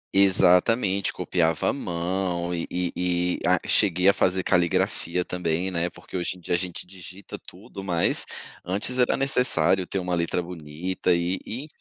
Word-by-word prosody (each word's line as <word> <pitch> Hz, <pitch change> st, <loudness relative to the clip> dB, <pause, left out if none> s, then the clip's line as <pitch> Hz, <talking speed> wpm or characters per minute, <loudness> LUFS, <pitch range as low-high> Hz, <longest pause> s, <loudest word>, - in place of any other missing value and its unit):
Exatamente, 95 Hz, +1 st, +4 dB
copiava 80 Hz, -3 st, 0 dB
a -, -, +1 dB
mão 90 Hz, -4 st, -2 dB
e 85 Hz, -, -3 dB
e 90 Hz, -1 st, -2 dB
e 90 Hz, 0 st, 0 dB
a -, -, +4 dB
cheguei 90 Hz, +1 st, +3 dB
a 100 Hz, -, +7 dB
fazer 95 Hz, 0 st, +1 dB
caligrafia 90 Hz, 0 st, +1 dB
também, 90 Hz, +1 st, -1 dB
né. 85 Hz, 0 st, -1 dB
Porque -, -, -13 dB
hoje 90 Hz, +1 st, -2 dB
em -, -, -15 dB
dia 85 Hz, -, -3 dB
a -, -, +4 dB
gente 90 Hz, -1 st, -5 dB
digita 95 Hz, +1 st, -10 dB
tudo, 95 Hz, -, -11 dB
mas 85 Hz, -3 st, +1 dB, 0.4 s
antes 105 Hz, +8 st, -2 dB
era 125 Hz, -, +3 dB
necessário 95 Hz, -9 st, +2 dB
ter 95 Hz, -, -3 dB
uma 90 Hz, -1 st, -2 dB
letra 85 Hz, +1 st, 0 dB
bonita 85 Hz, +2 st, -2 dB
e 85 Hz, +2 st, -1 dB
e 125 Hz, +6 st, -6 dB
enfim. -, -, -10 dB
90 Hz, 170 wpm, -25 LUFS, 85-95 Hz, 0.4 s, a